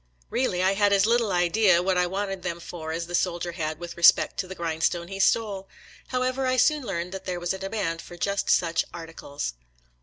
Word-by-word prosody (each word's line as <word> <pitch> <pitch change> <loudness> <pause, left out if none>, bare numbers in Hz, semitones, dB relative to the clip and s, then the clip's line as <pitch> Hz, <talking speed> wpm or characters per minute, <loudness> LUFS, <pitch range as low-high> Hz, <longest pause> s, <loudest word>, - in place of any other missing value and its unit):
Eeally, 185 -8 +1
I 190 +1 +3
had 205 0 +3
as 195 0 +4
little 230 -2 +2
idea 180 0 +3
what 190 0 +1
I 180 0 +2
wanted 195 0 -3
them 170 -1 -4
for 160 -2 -7
as 165 +1 -3
the 175 - -9
soldier 175 -1 0
had 155 -2 -3
with 175 +1 -8
respect 170 - +5
to 185 - -2
the 190 - -7
grindstone 170 +1 -1
he 195 0 -6
stole. 195 -2 +1 0.4
However, 255 +1 -1
I 255 0 +1
soon 300 +4 +3
learned 180 -4 -4
there 180 -2 -3
was 175 +1 -1
a 190 - -6
demand 195 -4 -3
for 175 - -11
just 200 +3 -1
such 165 -2 +3
arti 165 -1 -9
cles. 140 - -5
180 Hz, 210 wpm, -26 LUFS, 170-200 Hz, 0.4 s, respect